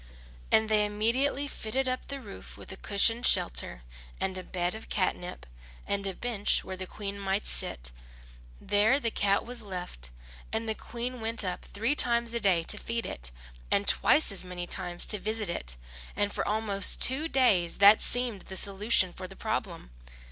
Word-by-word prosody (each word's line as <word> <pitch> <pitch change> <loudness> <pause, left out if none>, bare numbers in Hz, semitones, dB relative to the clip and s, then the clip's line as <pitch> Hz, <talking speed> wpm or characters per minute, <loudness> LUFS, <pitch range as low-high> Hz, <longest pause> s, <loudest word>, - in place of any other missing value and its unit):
And 220 0 +4
they 215 -1 +3
immediately 235 +7 0
fitted 260 +1 -3
up 255 0 -3
the 280 0 -6
roof 210 -6 -11
with - - -11
a - - -7
cushioned 225 +5 +3
shelter, - - +1 0.4
and 190 - -2
a 185 - -4
bed 180 -1 -2
of 220 +1 -10
catnip, 180 - -2 0.4
and 200 0 -2
a 190 - -3
bench 225 -4 -1
where 190 - -6
the 185 0 -7
Queen 200 0 -6
might 195 +1 -1
sit. 60 +1 -3 0.7
There 215 +7 +2
the 230 -5 -2
cat 200 -1 +1
was 245 0 -6
left; 180 - -7 0.4
and 225 +1 -2
the 220 - 0
Queen 240 +2 -5
went 225 0 -3
up 180 -1 -4
three 230 +7 -1
times 235 -4 +3
a 235 - -1
day 185 -6 +2
to - - -2
feed 230 0 -3
it, - - -5 0.4
and 200 - +1
twice 305 - +4
as 195 - -2
many 180 -1 -6
times 175 0 +2
to 210 - 0
visit 215 -2 -2
it, 60 - -1 0.4
and 205 +1 -1
for - - -2
almost 205 -2 +2
two 275 +5 +5
days 205 - +2
that 205 +2 +7
seemed 245 -5 0
the 190 - -6
solution 195 -2 +2
of 185 -1 -7
the 195 - -12
problem. - - -4
205 Hz, 180 wpm, -28 LUFS, 185-230 Hz, 0.7 s, that